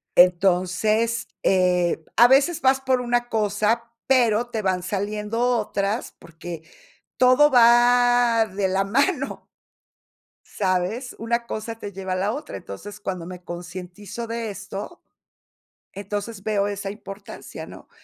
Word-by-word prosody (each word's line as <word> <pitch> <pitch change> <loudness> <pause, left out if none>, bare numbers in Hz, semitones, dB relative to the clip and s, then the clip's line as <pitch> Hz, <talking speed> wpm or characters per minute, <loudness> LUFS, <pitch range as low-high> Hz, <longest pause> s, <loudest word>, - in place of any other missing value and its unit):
Entonces, 190 +6 +3 0.2
eh, 180 -3 +2
a 240 - +8
veces 290 +6 +3
vas 265 0 +3
por 260 -1 +1
una 240 0 0
cosa, 220 +2 0 0.2
pero 240 -3 +3
te 225 -2 -3
van 185 -2 0
saliendo 210 +3 -3 0.2
otras, 205 0 -2
porque 170 -1 -9 0.5
todo 255 +4 +5
va 240 -1 +5
de 195 -1 -2
la 190 +1 +1
mano. 275 - 0 1.0
¿Sabes? 195 +6 -2
Una 235 +1 -2
cosa 225 +1 -5
te 205 - -6
lleva 190 -1 -4
a - - 0
la 195 +3 0
otra. 295 +5 -6
Entonces, 205 - -9
cuando 185 -4 -4
me 180 0 -9
concientizo 180 +6 -7
de 230 -1 -3
esto, 205 - -8 0.9
entonces 205 +1 -5
veo 205 -2 0
esa 200 -1 -4
importancia, 200 -1 -9
¿no? - - -13
210 Hz, 125 wpm, -23 LUFS, 190-240 Hz, 1.0 s, a